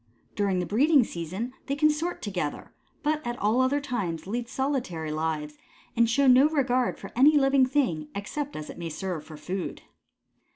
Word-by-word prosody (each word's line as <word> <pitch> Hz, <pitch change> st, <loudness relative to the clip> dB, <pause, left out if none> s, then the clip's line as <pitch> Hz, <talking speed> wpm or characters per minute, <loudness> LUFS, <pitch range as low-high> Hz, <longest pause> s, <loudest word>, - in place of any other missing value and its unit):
During 200 Hz, -2 st, +1 dB
the 180 Hz, -, 0 dB
breeding 275 Hz, -, +4 dB
season 190 Hz, +7 st, -5 dB
they 275 Hz, -, 0 dB
consort 305 Hz, +4 st, +1 dB
together, 180 Hz, -8 st, -4 dB, 0.3 s
but 305 Hz, 0 st, +1 dB
at 240 Hz, -1 st, -3 dB
all 220 Hz, +4 st, +2 dB
other 265 Hz, +3 st, +2 dB
times 200 Hz, -, -3 dB
lead 235 Hz, +4 st, -3 dB
solitary 250 Hz, -, -2 dB
lives 155 Hz, -1 st, -3 dB, 0.4 s
and 230 Hz, -1 st, +4 dB
show 275 Hz, +4 st, +3 dB
no 260 Hz, +3 st, +7 dB
regard 255 Hz, -5 st, +1 dB
for -, -, -9 dB
any 290 Hz, +5 st, +6 dB
living 270 Hz, -2 st, +4 dB
thing 245 Hz, -, 0 dB
except 285 Hz, +8 st, -4 dB
as 155 Hz, -, -6 dB
it -, -, -12 dB
may 170 Hz, -1 st, -4 dB
serve 175 Hz, -1 st, -4 dB
for 155 Hz, 0 st, -11 dB
food. 180 Hz, +5 st, -5 dB
240 Hz, 170 wpm, -27 LUFS, 175-275 Hz, 0.4 s, no